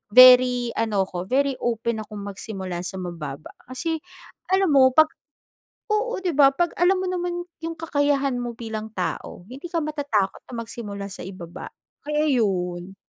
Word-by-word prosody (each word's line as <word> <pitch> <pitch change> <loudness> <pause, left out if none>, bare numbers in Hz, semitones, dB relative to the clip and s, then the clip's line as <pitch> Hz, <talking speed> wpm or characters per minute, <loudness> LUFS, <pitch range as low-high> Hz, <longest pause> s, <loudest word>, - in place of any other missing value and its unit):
very 250 -1 +8
ano 215 -4 +1
ako, 180 -1 -6
very 275 +4 +2
open 235 -1 -1
akong 210 -1 -8
magsimula 195 -3 -5
sa - - -6
mababa. 155 -5 -6 0.2
Kasi 320 +6 -2 0.5
alam 380 -2 +3
mo 265 -2 +7
'pag 315 0 +6 0.8
oo, 470 +2 0
'di 360 -5 -2
ba 275 -1 +7
'pag 345 +5 -1
alam 365 +2 +3
mo 375 - -2
naman 350 -1 -2 0.2
'yong 330 0 -4
kakayahan 285 -4 +1
mo 245 -1 -3
bilang 220 -1 -5
tao. 185 -2 -4
Hindi 275 +8 -9
ka 335 - +1
matatakot 285 -10 -1
na - - -9
magsimula 210 -3 -6
sa 195 - -8
ibaba, 175 -2 -8 0.3
kaya 300 +1 0
'yon. 190 -7 0
245 Hz, 155 wpm, -24 LUFS, 200-305 Hz, 0.8 s, very